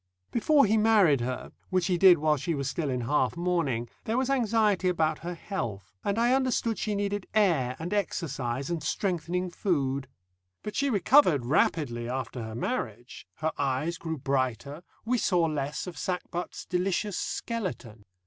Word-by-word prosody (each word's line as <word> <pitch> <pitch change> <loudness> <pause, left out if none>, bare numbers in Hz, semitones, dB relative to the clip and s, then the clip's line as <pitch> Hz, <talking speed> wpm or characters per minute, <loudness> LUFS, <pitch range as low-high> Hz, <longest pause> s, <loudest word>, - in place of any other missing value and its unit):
Before 280 +4 +4
he 220 +2 +3
married 205 - +4
her 125 +1 -4 0.2
which 185 -2 +1
he 180 - +1
did 185 -2 +8
while 155 0 +2
she 165 +4 -2
was 140 -2 -2
still 150 +2 -2
in 125 -1 -1
half 130 +3 +1
mourning 165 -10 0 0.2
there 225 +2 0
was 265 +1 +1
anxiety 215 -7 +2
about 160 -3 +1
her 175 +1 -5
health, 115 - -5
and 200 +1 0
I 240 +2 +3
understood 255 -4 +1
she 210 -1 -1
needed 205 -1 -2
air 160 -12 +3
and 170 +5 -4
exercise 140 -8 -2
and 170 -2 -2
strengthening 180 +1 -1
food. 140 -8 -1 0.6
But 210 - -5
she 280 0 +1
recovered 200 - +4
rapidly 120 -3 +1
after 125 -1 -4
her 110 -1 -6
marriage, 120 - -4
her 160 0 -1
eyes 145 +5 -1
grew 160 -1 -4
brighter, 135 +2 -2 0.2
we 245 +1 +1
saw 180 -5 +2
less 150 -2 -2
of 180 -2 -7
Sackbut's 180 -1 -4
"delicious 190 +2 -1
skeleton." 175 - -4
170 Hz, 160 wpm, -28 LUFS, 135-205 Hz, 0.6 s, did